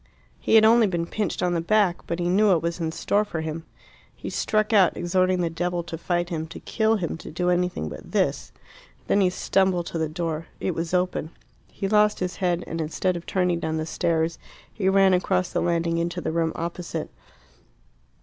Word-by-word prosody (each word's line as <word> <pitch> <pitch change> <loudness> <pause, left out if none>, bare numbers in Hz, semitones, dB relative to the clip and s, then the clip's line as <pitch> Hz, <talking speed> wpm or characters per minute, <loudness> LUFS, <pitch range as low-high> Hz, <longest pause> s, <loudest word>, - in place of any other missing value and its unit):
He - - +2
had 220 -1 +8
only 225 0 +6
been 170 -3 -1
pinched 205 +1 -2
on 180 -1 +1
the 170 - 0
back, 195 0 +1
but 170 - -2
he 175 0 -1
knew 200 +4 +3
what 175 -5 +3
was 170 +1 -2
in 160 -1 -1
store 205 +5 +1
for 170 -6 -4
him. 160 +1 -5 0.5
He - - -7
struck 215 0 0
out, 195 -4 +4
exhorting 185 +1 +1
the 170 - 0
devil 175 +1 -2
to 165 0 -6
fight 175 +1 -1
him, 160 -2 -3
to 165 - -9
kill 220 0 +1
him, 170 -6 -3
to - - -10
do 180 +3 0
anything 180 - 0
but - - -9
this. - - 0 0.5
Then 200 - +2
he 185 - +4
stumbled 185 -1 +1
to 165 - -4
the 160 -1 -1
door. 165 -1 -3
It 185 - -1
was 165 +2 -2
open. 180 -3 0 0.4
He 195 - -4
lost 210 +1 +3
his 180 0 -3
head, 175 -2 0
and, 165 - -4
instead 175 +4 -1
of 170 - -7
turning 180 -2 +1
down 160 -1 -2
the 155 - -2
stairs, 165 -1 -1 0.3
he 190 -3 0
ran 195 -1 +5
across 185 0 +1
the - - +1
landing 170 -1 0
into 175 +1 -2
the 170 - -2
room 165 0 0
opposite. 170 -1 -4
175 Hz, 205 wpm, -25 LUFS, 165-190 Hz, 0.5 s, had